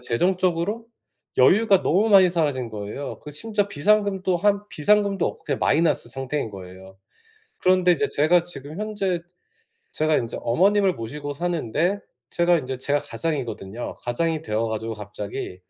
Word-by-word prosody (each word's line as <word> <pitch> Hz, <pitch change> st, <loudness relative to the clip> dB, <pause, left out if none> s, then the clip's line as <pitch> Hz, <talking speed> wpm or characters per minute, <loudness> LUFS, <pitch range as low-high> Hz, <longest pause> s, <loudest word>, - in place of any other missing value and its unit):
재정적으로 180 Hz, -, 0 dB, 0.5 s
여유가 195 Hz, -, +5 dB
너무 205 Hz, +7 st, +2 dB
많이 190 Hz, -3 st, +7 dB
사라진 145 Hz, -8 st, -1 dB
거예요. 105 Hz, +6 st, -6 dB
그 150 Hz, -, -9 dB
심지어 205 Hz, +6 st, -1 dB
비상금도 195 Hz, +2 st, +1 dB
한 205 Hz, +2 st, +2 dB
비상금도 200 Hz, +3 st, +2 dB
없고 -, -, -6 dB
그냥 -, -, -2 dB
마이너스 155 Hz, -5 st, +2 dB
상태인 135 Hz, +1 st, -3 dB
거예요. 95 Hz, 0 st, -11 dB, 0.6 s
그런데 185 Hz, -1 st, +3 dB
이제 215 Hz, +5 st, 0 dB
제가 165 Hz, +4 st, +3 dB
지금 155 Hz, -1 st, -9 dB
현재 200 Hz, -5 st, -2 dB, 0.7 s
제가 155 Hz, 0 st, +1 dB
인제 115 Hz, -, -3 dB
어머님을 190 Hz, -, +3 dB
모시고 145 Hz, +5 st, -6 dB
사는데 170 Hz, -, -1 dB, 0.3 s
제가 175 Hz, 0 st, +3 dB
인제 130 Hz, -2 st, -5 dB
제가 145 Hz, +2 st, +1 dB
가장이거든요. 120 Hz, -8 st, -4 dB
가장이 160 Hz, +6 st, -1 dB
되어 110 Hz, -5 st, -1 dB
가지고 110 Hz, +1 st, -3 dB
갑자기 100 Hz, -3 st, -7 dB
160 Hz, 355 characters per minute, -23 LUFS, 125-190 Hz, 0.7 s, 많이